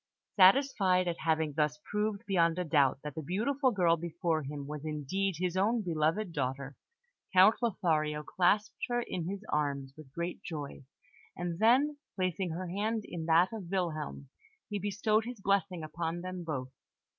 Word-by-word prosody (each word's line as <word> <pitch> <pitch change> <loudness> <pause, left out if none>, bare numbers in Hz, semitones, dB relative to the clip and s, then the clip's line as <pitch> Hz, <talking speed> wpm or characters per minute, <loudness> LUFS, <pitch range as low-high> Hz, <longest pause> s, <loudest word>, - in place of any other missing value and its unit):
Satisfied 190 -3 +5
at 170 -1 -2
having 160 -2 0
thus 150 0 +1
proved 210 -1 -1
beyond 170 -4 +2
a 180 - 0
doubt 145 -6 +3
that 150 -1 -5
the 160 - -5
beautiful 245 - +1
girl 175 -7 +3
before 165 -1 -1
him 145 0 -6
was 150 0 -6
indeed 160 +5 -2
his 180 0 -1
own 215 +4 +2
beloved 170 +3 0
daughter, 135 0 -3 0.6
Count 190 +6 +6
Lothario 155 -9 0
clasped 190 +6 +1
her 240 0 0
in 170 -6 -4
his 200 +1 -5
arms 140 -3 -1
with 155 -4 -13
great 170 +4 -4
joy; 145 -4 -6 0.5
and 175 -1 -3
then, 275 +6 +4 0.2
placing 185 -1 -1
her 175 +3 -4
hand 210 +5 -1
in 165 -2 -6
that 170 +5 +4
of 200 -6 -6
Wilhelm, 155 -7 -3 0.4
he 205 - -1
bestowed 210 +3 +1
his 245 -2 -7
blessing 195 -3 0
upon 165 +2 -3
them 185 0 -5
both. 130 -6 -4
175 Hz, 160 wpm, -31 LUFS, 155-200 Hz, 0.6 s, Count